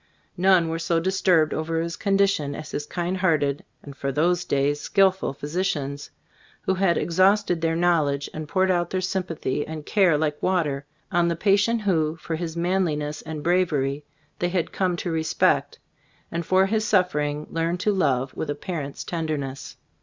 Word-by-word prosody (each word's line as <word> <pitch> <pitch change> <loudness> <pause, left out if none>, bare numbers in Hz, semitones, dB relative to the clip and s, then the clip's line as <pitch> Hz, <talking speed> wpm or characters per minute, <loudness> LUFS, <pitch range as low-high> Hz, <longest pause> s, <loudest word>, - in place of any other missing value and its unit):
None 185 -2 +4
were 165 0 -2
so 165 0 +1
disturbed 180 -3 +2
over 165 +1 -1
his 165 0 -3
condition 195 -8 +1
as 155 - -8
his 145 - -4
kind 175 +1 -2
hearted, 150 -6 +1 0.2
and 140 -1 -10
for 140 0 -3
those 175 +5 +1
days, 140 +1 0
skillful 190 -5 +2
physicians, 145 -1 -3 0.5
who 190 - +1
had 185 -2 +2
ex 170 0 -3
hausted 190 -2 +3
their 165 0 +1
knowledge 155 -5 +1
and 155 -1 -6
poured 185 +3 +2
out 175 -2 0
their 185 - -1
sympathy 180 -6 -2
and 155 -2 -7
care 185 -7 +3
like 150 -1 -1
wa 185 -2 +2
ter, 140 -2 -4 0.3
on 175 0 +3
the 170 - 0
patient 205 +5 +2
who, 160 -5 +1
for 165 0 -5
his 165 0 -5
man 185 +3 +1
liness 150 -2 -3
and 155 -2 -5
bravery, 150 -6 +1 0.4
they 175 - 0
had 175 -2 -1
come 185 -2 0
to 170 0 -3
respect, 160 -1 +1 0.5
and 170 -1 -3
for 190 +1 +4
his 215 +2 0
suffering 150 -8 +1
learned 165 +2 -1
to 210 - +2
love 135 -8 +1
with 155 - -4
a 145 - -1
parent's 145 -3 -5
tenderness. 155 -5 -4
165 Hz, 175 wpm, -24 LUFS, 150-185 Hz, 0.5 s, None